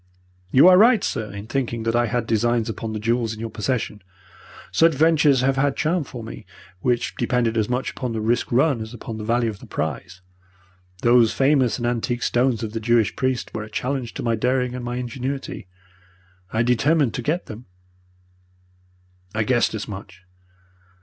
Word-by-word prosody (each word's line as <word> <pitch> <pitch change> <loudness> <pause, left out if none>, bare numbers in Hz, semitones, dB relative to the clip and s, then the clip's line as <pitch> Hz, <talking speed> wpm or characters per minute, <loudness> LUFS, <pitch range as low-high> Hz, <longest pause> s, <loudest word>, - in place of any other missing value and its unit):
You 135 - +6
are 185 0 +8
right, 225 -1 +5
sir, 105 -3 -3
in 100 +1 -7
thinking 120 -2 -2
that 115 +1 0
I 120 0 +2
had 120 +1 -1
designs 115 +1 +1
upon 115 0 -4
the 110 - -3
jewels 115 0 0
in - - -12
your 115 0 -5
possession. 110 -2 -2 0.7
Such 165 -2 +4
ventures 150 -3 +4
have 135 +1 +1
had 140 0 +2
a - - -24
charm 165 +1 0
for 120 -3 -8
me, 110 -4 -9 0.3
which 120 +2 0
depended 120 -1 0
as 110 -1 0
much 125 +1 -1
upon 125 -2 -4
the 115 - -3
risk 115 +3 0
run 130 0 +2
as 110 +2 -7
upon 115 -2 -7
the - - -5
value 115 +1 +1
of 100 - -12
the - - -13
prize. 90 +5 -4 0.8
Those 120 -1 +5
famous 135 -3 +2
and 120 - -3
antique 120 0 -1
stones 120 -2 +1
of 110 -1 -4
the 115 - -2
Jewish 115 -1 +2
priest 130 -1 -2
were - - -3
a 105 - -8
challenge 125 +2 -3
to - - -4
my 115 - +1
daring 125 +2 0
and 125 -1 -5
my 120 0 -3
ingenuity. 125 -3 -5 0.8
I 115 +1 +1
determined 130 +2 +2
to - - -3
get 160 +9 -1
them.' 110 +2 -10 1.7
"'I 110 - +1
guessed 120 0 +1
as 110 - -5
much.' 95 -2 -9
120 Hz, 190 wpm, -22 LUFS, 110-130 Hz, 1.7 s, are